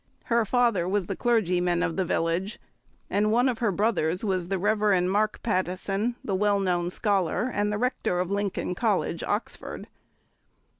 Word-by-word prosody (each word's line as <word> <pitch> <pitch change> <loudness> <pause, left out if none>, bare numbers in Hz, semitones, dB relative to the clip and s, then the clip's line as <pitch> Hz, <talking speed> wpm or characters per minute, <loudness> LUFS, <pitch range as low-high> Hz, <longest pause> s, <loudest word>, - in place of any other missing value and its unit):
Her 235 -1 +1
father 230 -7 +2
was 200 -1 0
the - - -4
clergyman 180 -7 +1
of 170 -2 -1
the 190 - +1
village, 175 +5 -1 0.5
and 210 +1 +1
one 245 +3 +3
of 245 -3 -1
her 230 -4 +1
brothers 185 -3 0
was 185 -3 -1
the 195 +1 -1
Rev. 205 -1 +2
Mark 205 +4 0
Pattison, 195 +3 -1
the 200 - -2
well 200 +1 +2
known 175 -2 0
scholar 200 +3 0
and 210 0 0
the 210 - -1
Rector 240 -6 -1
of 180 +1 -2
Lincoln 200 -2 -1
College, 195 -4 0
Oxford. 210 +3 -4
200 Hz, 160 wpm, -26 LUFS, 180-215 Hz, 0.5 s, one